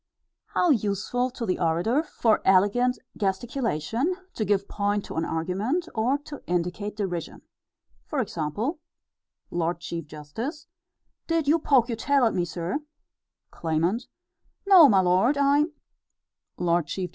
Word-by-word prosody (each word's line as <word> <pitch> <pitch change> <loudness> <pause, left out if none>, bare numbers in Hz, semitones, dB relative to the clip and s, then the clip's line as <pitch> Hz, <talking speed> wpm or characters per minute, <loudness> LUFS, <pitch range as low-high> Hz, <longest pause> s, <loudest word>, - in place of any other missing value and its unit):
How 355 - +4
useful 225 +2 0
to 245 -2 -5
the 185 - -1
orator, 175 - +2
for 230 -8 +1
elegant 205 +7 +3 0.2
gesticulation, 230 - -1 0.2
to 220 - -2
give 200 -1 +1
point 205 0 -1
to - - -8
an 165 +1 0
argument, 200 - -1
or 240 +5 +1
to 290 -2 -8
indicate 180 +4 -2
derision. 175 -5 -4 0.6
For 300 - -2
example: 215 - -2 0.7
Lord 170 0 -1
Chief 170 -2 -6
Justice: 220 - -6 0.6
Did 330 -3 0
you 320 +3 +4
poke 265 -6 +3
your 230 - -3
tail 275 +2 +3
at 225 - +2
me, 175 -2 0
sir? 175 - -3 0.7
Claimant: 170 +8 -1 0.6
No, 365 -7 +8
my 195 -4 +5
lord; 185 +10 +3
I 280 +1 +4 0.9
_L. 170 -2 +1
C. 190 - -2
J. - - -7
210 Hz, 135 wpm, -26 LUFS, 175-265 Hz, 0.9 s, No